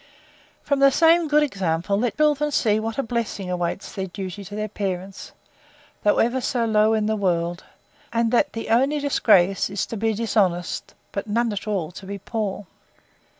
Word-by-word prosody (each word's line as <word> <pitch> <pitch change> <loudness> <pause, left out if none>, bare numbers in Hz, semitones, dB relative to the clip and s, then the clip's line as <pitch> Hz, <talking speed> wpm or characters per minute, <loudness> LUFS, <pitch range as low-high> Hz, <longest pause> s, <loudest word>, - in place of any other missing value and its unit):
From 280 -1 0
the 275 0 +7
same 330 +3 +4
good 300 0 +4
example, 195 - -1
let 230 +3 -1
children 300 -1 +2
see 220 -6 +2
what 225 0 -4
a 275 - 0
blessing 225 -5 -3
awaits 180 +2 -3
their 190 -1 -3
duty 190 +1 -6
to 205 - -8
their 215 0 -2
parents, 195 -2 -5 0.7
though 205 - +3
ever 245 +3 +2
so 240 -1 0
low 215 0 +3
in 215 -1 0
the 220 +1 +1
world; 175 -3 -1 0.5
and 230 -1 +1
that 245 - +2
the 225 - -5
only 265 +6 +3
disgrace, 195 -11 +3
is 200 0 -2
to 225 - -6
be 220 +1 0
dishonest; 195 -6 -1 0.2
but 200 +2 -4
none 230 +1 0
at 205 +2 -5
all 185 -6 -2
to 190 +2 -11
be 200 +1 -5
poor. 205 0 -4
215 Hz, 180 wpm, -23 LUFS, 195-235 Hz, 0.7 s, the